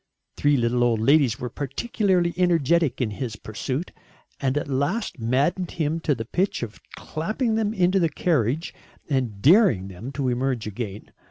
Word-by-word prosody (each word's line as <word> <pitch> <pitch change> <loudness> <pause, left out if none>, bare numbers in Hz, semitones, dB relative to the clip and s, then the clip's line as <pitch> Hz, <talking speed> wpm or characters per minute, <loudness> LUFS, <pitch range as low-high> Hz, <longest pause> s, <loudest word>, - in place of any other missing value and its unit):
Three 145 -1 +3
little 120 0 +1
old 120 -2 +2
ladies 135 0 +3
were 125 -2 -4
particularly 175 - 0
energetic 170 -4 +2
in 115 -4 0
his 115 0 -4
pursuit, 130 - -4 0.5
and 135 0 0
at 145 - -2
last 145 - -1
maddened 140 +10 +1
him 160 -1 -1
to 150 -3 0
the 115 -1 -5
pitch 185 - -1
of 110 -2 -7 0.2
clapping 215 - -2
them 220 -1 +1
into 185 -2 +2
a 165 - +3
carriage 150 -2 0 0.3
and 125 -8 -2
daring 145 - +5
them 100 +8 -8
to 130 -1 -1
emerge 125 -1 -1
again. 105 -1 -6
140 Hz, 160 wpm, -24 LUFS, 120-175 Hz, 0.5 s, daring